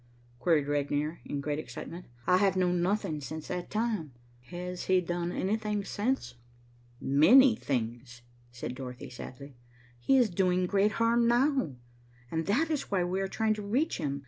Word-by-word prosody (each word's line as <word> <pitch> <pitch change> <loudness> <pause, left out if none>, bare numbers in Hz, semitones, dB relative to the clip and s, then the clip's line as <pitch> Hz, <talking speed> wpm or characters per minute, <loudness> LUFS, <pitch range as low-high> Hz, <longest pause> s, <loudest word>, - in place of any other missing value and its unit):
queried 155 -3 +2
Regnier, 145 +2 -1
in 140 - -3
great 150 +1 -2
excitement. 170 +2 -8 0.2
"I 180 - +5
have 195 0 +3
known 180 -1 +2
nothing 185 -4 0
since 155 +3 -7
that 180 -1 -4
time. 215 - -2 0.3
Has 180 +5 -6
he 185 0 +4
done 175 0 -2
anything 210 +1 -1
since?" 205 - -1 0.7
"Many 225 - +6
things," 120 - -4 0.3
said 120 0 -5
Dorothy 125 -1 -8
sadly. 130 +1 -10 0.4
"He 270 - +3
is 240 -6 +3
doing 180 0 +2
great 200 +3 +2
harm 235 +1 +3
now, 240 - +2 0.6
and 160 0 -2
that 295 +11 +2
is 295 -3 -2
why 190 -3 +1
we 185 +2 -1
are 195 - -1
trying 220 +2 +1
to 215 - -5
reach 240 +9 0
him. 140 -3 -2
180 Hz, 160 wpm, -30 LUFS, 145-215 Hz, 0.7 s, Many